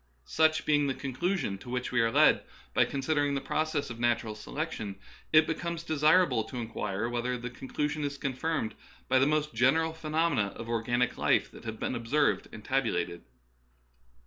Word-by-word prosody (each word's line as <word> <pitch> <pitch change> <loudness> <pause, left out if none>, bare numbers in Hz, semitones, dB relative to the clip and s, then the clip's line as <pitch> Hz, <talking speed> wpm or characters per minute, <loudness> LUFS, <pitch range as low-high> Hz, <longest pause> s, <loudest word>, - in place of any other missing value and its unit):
Such 155 0 +2
being 145 -1 +3
the 135 - -1
conclusion 140 - -2
to 125 - -11
which 125 0 -2
we 125 -2 +3
are 115 - +3
led - - +5 0.3
by - - +4
considering 145 +1 0
the - - 0
process 155 -2 -1
of 115 - -8
natural 120 -2 +1
selection, 110 -3 -5 0.4
it 155 0 +7
becomes 170 +1 -3
desirable 155 -5 +3
to 130 - -8
inquire 110 -2 -3
whether 120 +1 -1
the 120 0 -6
conclu 135 +4 -2
sion 150 0 -3
is 140 0 -3
confirmed 140 -2 -2 0.3
by 130 - +4
the 135 - +4
most 150 -1 0
general 140 +8 +3
phenomena 155 -9 0
of 115 - -7
organic 120 +1 0
life - - +2
that - - -13
have 110 -1 -5
been - - -2
observed 125 +5 +1
and 105 - -10
tab 135 -1 +1
ulated. 85 -4 -2
135 Hz, 175 wpm, -29 LUFS, 115-155 Hz, 0.4 s, it